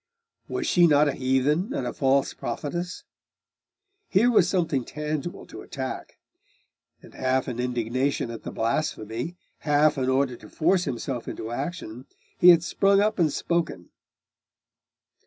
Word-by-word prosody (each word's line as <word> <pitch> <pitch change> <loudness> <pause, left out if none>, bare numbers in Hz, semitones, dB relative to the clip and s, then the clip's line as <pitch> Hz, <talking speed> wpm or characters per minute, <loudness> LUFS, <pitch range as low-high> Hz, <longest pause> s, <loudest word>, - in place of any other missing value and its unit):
Was - - -3
she 175 -1 +5
not 150 -1 +4
a 140 - 0
heathen 140 - +1
and 125 - -2
a 120 - -3
false 135 0 +2
prophetess? 170 +9 -4 1.1
Here 230 +6 +4
was 185 -6 +4
something 165 -9 0
tangible 150 +4 -4
to - - -10
attack; - - -6 0.9
and - - -15
half 130 0 0
in 125 -2 -4
indignation 125 +1 -1
at 115 - -7
the - - -6
blasphemy, 115 +3 -2 0.2
half 150 -1 +3
in 130 0 0
order 130 -1 +1
to - - -14
force 175 +3 +2
himself 120 0 -4
into 110 - -5
action, 130 -3 -5 0.3
he 180 - +8
had 170 -2 +7
sprung 195 +3 +3
up 210 -1 +1
and 160 -4 +3
spoken. 170 - -2
145 Hz, 140 wpm, -25 LUFS, 125-170 Hz, 1.1 s, he